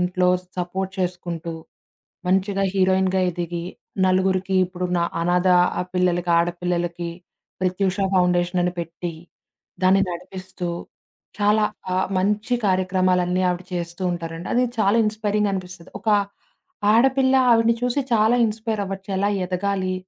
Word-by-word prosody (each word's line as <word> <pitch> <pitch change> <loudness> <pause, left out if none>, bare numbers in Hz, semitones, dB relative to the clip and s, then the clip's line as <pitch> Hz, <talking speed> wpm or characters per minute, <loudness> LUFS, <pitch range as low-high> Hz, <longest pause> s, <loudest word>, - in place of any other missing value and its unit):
ఇంట్లో 180 0 +1 0.3
సపోర్ట్ 185 +2 -3
చేసుకుంటూ. 175 -2 -3 0.7
మంచిగా 195 +1 +1
హీరోయిన్‌గా 190 0 +2
ఎదిగి, 170 0 -4 0.4
నలుగురికి 185 0 +1
ఇప్పుడు 180 0 -4
న - - +1 0.2
అనాధా 180 +1 +3 0.4
పిల్లలకి, 175 -1 +1
ఆడపిల్లలకి 175 0 -1 0.5
ప్రత్యుష 185 +1 0 0.2
ఫౌండేషనని 180 0 +2
పెట్టి. 170 0 -5 0.7
దాన్ని 190 +1 +5
నడిపిస్తూ. 180 0 -6 0.7
చాలా 210 +1 +3 0.3
ఆహ్, 185 +1 +1
మంచి 210 +5 0
కార్యక్రమాలన్నీ 185 -1 +1
ఆవిడ 180 +1 -3
చేస్తూ 170 +1 -4
ఉంటారండి. 165 0 -6
అది 250 - +3 0.2
చాలా 210 +1 +3
ఇన్స్పైరింగనిపిస్తది. 200 -4 -2
ఒక 220 - -4 0.8
ఆడపిల్ల, 265 +3 +4 0.2
ఆవిడ్ని 230 0 +4
చూసి 250 +3 0
చాలా 220 +2 +4
ఇన్స్పైరవ్వచ్చు. 210 -3 -4
ఎలా 200 +2 +1 0.2
ఎదగాలి. 185 +1 -1
185 Hz, 105 wpm, -22 LUFS, 175-200 Hz, 0.8 s, దాన్ని